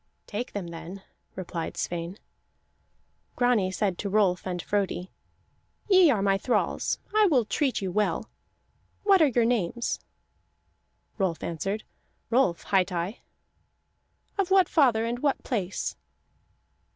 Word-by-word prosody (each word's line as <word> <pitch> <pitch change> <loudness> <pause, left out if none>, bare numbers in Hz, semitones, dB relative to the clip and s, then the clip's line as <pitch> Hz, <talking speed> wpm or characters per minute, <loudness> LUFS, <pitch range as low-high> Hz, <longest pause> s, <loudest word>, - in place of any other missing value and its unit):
"Take 230 +4 -5
them 190 -4 -4
then," 175 +3 -8 0.3
replied 175 -3 -5
Sweyn. 175 +2 -3 1.2
Grani 245 -6 +2
said 190 -1 -1
to 200 - -2
Rolf 190 -3 +2
and 180 -1 -3
Frodi: 190 0 -2 0.8
"Ye 375 -5 +7
are 215 -8 +2
my 195 -1 +2
thralls; 245 - 0 0.2
I 430 -1 +6
will 260 - +3
treat 255 +1 0
you 185 - -2
well. 210 +1 0 0.8
What 395 -3 +5
are 310 - +7
your 240 -3 +2
names?" 235 -1 0 1.2
Rolf 185 -5 0
answered: 195 +6 -3 0.5
"Rolf 230 -8 +2
hight 190 -1 +2
I." 180 +5 -3 1.2
"Of 390 -2 +1
what 380 -1 +5
father 245 -8 +3
and 240 +1 -2
what 280 0 0
place?" 200 -7 -2
205 Hz, 125 wpm, -27 LUFS, 185-245 Hz, 1.2 s, Ye